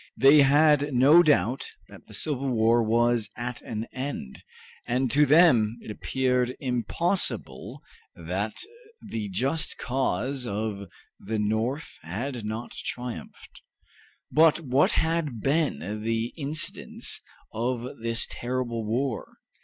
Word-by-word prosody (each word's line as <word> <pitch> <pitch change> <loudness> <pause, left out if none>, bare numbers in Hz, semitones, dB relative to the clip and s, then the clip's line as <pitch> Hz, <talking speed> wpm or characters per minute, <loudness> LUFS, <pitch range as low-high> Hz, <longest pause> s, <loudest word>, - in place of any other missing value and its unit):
They 140 +2 +7
had 145 0 +4
no 145 +7 +7
doubt 140 -6 +2 0.2
that - - -15
the - - -8
civil 140 -3 -1
war 115 0 +3
was 115 0 +2
at 120 +1 -4
an 110 0 -5
end, 130 - -6 0.4
and 125 0 0
to 145 +1 +4
them 125 -8 +5
it 110 - -8
appeared 125 +2 0
impossible 125 - -1 0.3
that 95 +6 -3 0.5
the 105 -3 -4
just 135 - -1
cause 130 0 -1
of 100 -2 -4 0.3
the 110 +3 -3
North 110 +8 -2
had 115 - -5
not 110 +3 -5
triumphed. 125 -1 -7 0.7
But 160 +1 +5
what 135 -1 +2
had 160 -7 0
been 120 - -1
the 115 +1 -1
incidents 155 0 -4 0.3
of 120 +2 -3
this 115 0 0
terrible 120 -2 -3
war? 120 +3 -2
125 Hz, 115 wpm, -26 LUFS, 110-140 Hz, 0.7 s, They